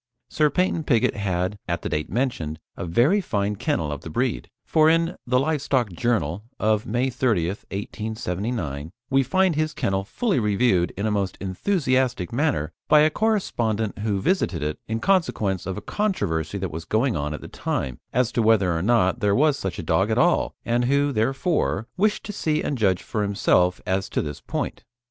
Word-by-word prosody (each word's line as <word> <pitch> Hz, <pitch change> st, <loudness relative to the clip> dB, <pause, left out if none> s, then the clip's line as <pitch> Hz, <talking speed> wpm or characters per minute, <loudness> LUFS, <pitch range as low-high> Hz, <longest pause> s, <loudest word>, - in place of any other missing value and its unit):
Sir 150 Hz, -1 st, +3 dB
Paynton 180 Hz, -1 st, 0 dB
Pigott 120 Hz, -7 st, +2 dB
had, 95 Hz, 0 st, -1 dB
at 85 Hz, -1 st, -2 dB
the -, -, -2 dB
date 75 Hz, 0 st, -2 dB
mentioned, 100 Hz, -, -1 dB, 0.2 s
a 85 Hz, -, -5 dB
very 130 Hz, -, +3 dB
fine 105 Hz, -, -1 dB
kennel 80 Hz, -5 st, -1 dB
of 70 Hz, -, -5 dB
the -, -, -8 dB
breed, -, -, -1 dB, 0.2 s
for 155 Hz, 0 st, +4 dB
in 165 Hz, +1 st, +2 dB
The 125 Hz, +1 st, +3 dB
Live 150 Hz, +1 st, 0 dB
Stock 125 Hz, -7 st, 0 dB
Journal 100 Hz, -2 st, -1 dB, 0.2 s
of 110 Hz, 0 st, +1 dB
May 125 Hz, +4 st, 0 dB
30th, 105 Hz, -8 st, 0 dB
1879, 100 Hz, -, -4 dB, 0.2 s
we 135 Hz, 0 st, +5 dB
find 185 Hz, +6 st, +2 dB
his 155 Hz, 0 st, -1 dB
kennel 95 Hz, 0 st, 0 dB
fully 200 Hz, -, 0 dB
reviewed 105 Hz, -4 st, +2 dB
in 100 Hz, -, -2 dB
a 110 Hz, -, +1 dB
most 100 Hz, -2 st, -1 dB
enthusiastic 130 Hz, -, 0 dB
manner 125 Hz, -, 0 dB, 0.2 s
by 150 Hz, -, +6 dB
a 155 Hz, +1 st, +4 dB
correspondent 115 Hz, -, 0 dB
who 105 Hz, -2 st, 0 dB
visited 95 Hz, -, 0 dB
it 75 Hz, 0 st, -3 dB
in 110 Hz, +1 st, -2 dB
consequence 110 Hz, -, +1 dB
of 95 Hz, +1 st, -3 dB
a -, -, -5 dB
controversy 100 Hz, -, -1 dB
that 95 Hz, -4 st, -3 dB
was 80 Hz, +2 st, -5 dB
going 115 Hz, +5 st, +1 dB
on 75 Hz, 0 st, -2 dB
at -, -, -9 dB
the -, -, -8 dB
time, 65 Hz, -2 st, -3 dB
as 125 Hz, -1 st, +1 dB
to 120 Hz, -, +1 dB
whether 105 Hz, -6 st, +3 dB
or 80 Hz, -, -1 dB
not 110 Hz, +1 st, +2 dB
there 100 Hz, -3 st, +2 dB
was 150 Hz, +1 st, +4 dB
such 95 Hz, -9 st, -4 dB
a -, -, -4 dB
dog 80 Hz, +6 st, +2 dB
at 110 Hz, -, +1 dB
all, 175 Hz, +5 st, +2 dB
and 120 Hz, +1 st, +1 dB
who, 140 Hz, +2 st, +2 dB
therefore, 130 Hz, -, 0 dB
wished 210 Hz, +3 st, +1 dB
to 210 Hz, -, -6 dB
see 155 Hz, -4 st, 0 dB
and 145 Hz, -, -1 dB
judge 95 Hz, -4 st, +2 dB
for 110 Hz, -, -2 dB
himself 90 Hz, -3 st, +2 dB
as 95 Hz, +1 st, -1 dB
to -, -, -1 dB
this 75 Hz, -2 st, -6 dB
point. -, -, -4 dB
110 Hz, 190 wpm, -24 LUFS, 95-140 Hz, 0.2 s, by